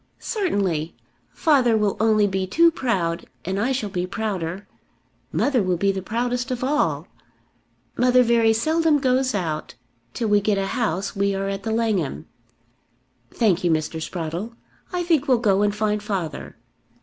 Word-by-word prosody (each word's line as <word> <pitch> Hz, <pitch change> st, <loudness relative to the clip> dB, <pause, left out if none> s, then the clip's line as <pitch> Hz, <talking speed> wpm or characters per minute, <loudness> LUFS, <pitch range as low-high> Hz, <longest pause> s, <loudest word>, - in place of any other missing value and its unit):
"Certainly. 195 Hz, -, -1 dB, 0.4 s
Father 260 Hz, -8 st, +3 dB
will 210 Hz, -2 st, +1 dB
only 215 Hz, -1 st, +4 dB
be 190 Hz, -1 st, -1 dB
too 335 Hz, -, +4 dB
proud, 185 Hz, -, -1 dB, 0.2 s
and 190 Hz, +2 st, -2 dB
I 240 Hz, +6 st, +1 dB
shall 220 Hz, -6 st, -2 dB
be 180 Hz, 0 st, -2 dB
prouder. 195 Hz, -3 st, -4 dB, 0.6 s
Mother 270 Hz, -5 st, +1 dB
will 185 Hz, -2 st, 0 dB
be 200 Hz, +3 st, +2 dB
the 190 Hz, -1 st, -4 dB
proudest 245 Hz, +5 st, -2 dB
of 255 Hz, -1 st, -3 dB
all. 295 Hz, +3 st, 0 dB, 0.9 s
Mother 250 Hz, 0 st, +4 dB
very 230 Hz, -1 st, +3 dB
seldom 315 Hz, +7 st, +2 dB
goes 260 Hz, -2 st, +1 dB
out. 160 Hz, -8 st, -3 dB, 0.4 s
Till 230 Hz, -, -1 dB
we 205 Hz, 0 st, +4 dB
get 205 Hz, 0 st, +1 dB
a 195 Hz, -, 0 dB
house 200 Hz, -5 st, -2 dB
we 200 Hz, 0 st, +1 dB
are 195 Hz, 0 st, -2 dB
at 195 Hz, 0 st, -3 dB
The 220 Hz, -, -3 dB
Langham. 220 Hz, -9 st, -1 dB, 1.0 s
Thank 200 Hz, -6 st, +1 dB
you, 175 Hz, -, +2 dB
Mr. 160 Hz, 0 st, -1 dB
Sprottle. 175 Hz, +7 st, -4 dB, 0.4 s
I 360 Hz, -1 st, -1 dB
think 320 Hz, -5 st, +1 dB
we'll 255 Hz, -2 st, +4 dB
go 205 Hz, -4 st, +2 dB
and 205 Hz, 0 st, +1 dB
find 210 Hz, 0 st, 0 dB
father." 190 Hz, -7 st, -4 dB
210 Hz, 160 wpm, -23 LUFS, 190-245 Hz, 1.0 s, only